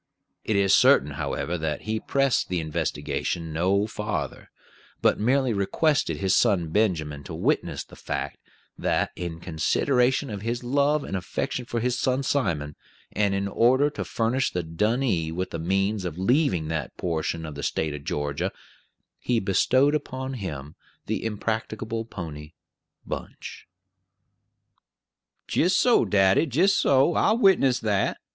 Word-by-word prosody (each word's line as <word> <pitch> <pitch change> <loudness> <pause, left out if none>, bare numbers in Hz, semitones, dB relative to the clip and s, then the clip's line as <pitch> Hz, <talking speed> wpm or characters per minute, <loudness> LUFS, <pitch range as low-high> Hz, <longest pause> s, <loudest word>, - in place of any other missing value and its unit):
It 110 - -1
is 100 -1 +3
certain, 75 - +5
however, 85 +4 -3
that 80 -2 -2
he 110 0 -2
pressed 135 +2 +1
the 90 -1 0
investigation 80 +1 -3
no 95 +5 +2
farther, 105 -1 -4 0.5
but - - +2
merely 130 +2 +2
requested 100 - +1
his 95 +4 +1
son 95 -8 +2
Benjamin 80 -8 0
to - - -6
witness - - 0
the - - -16
fact - - -4 0.4
that, - - 0
in 85 -2 -5
consideration 125 - +1
of 100 -2 -5
his 120 +3 -3
love 140 +3 +2
and - - -4
affection 125 +7 -3
for 120 0 -2
his 125 +1 -1
son 130 +2 +1
Simon, 85 - -1 0.4
and 100 -1 +1
in 100 0 -1
order 130 +8 +3
to - - -4
furnish 120 +3 0
the 90 - -3
donee 95 0 0
with 90 +3 -3
the 85 - -4
means 95 +4 0
of 85 -3 -4
leaving 95 - +2
that 80 -1 -4
portion 80 -1 -2
of 75 - -6
the 70 - -7
State 80 +1 -1
of 75 -1 -7
Georgia, 75 +6 -2 0.7
he 120 -2 +1
bestowed 130 +8 +3
upon 130 -3 -3
him 75 - -6 0.3
the - - -2
impracticable 110 +1 -3
pony, 80 -7 -8 0.5
Bunch. - - -7 1.8
"Jist 185 +4 +2
so, 245 -1 +4
daddy; 95 +8 +3
jist 175 - +3
so; 140 +4 +4
I'll 220 - +3
witness 185 - +4
that. 105 -3 0
100 Hz, 145 wpm, -25 LUFS, 80-125 Hz, 1.8 s, certain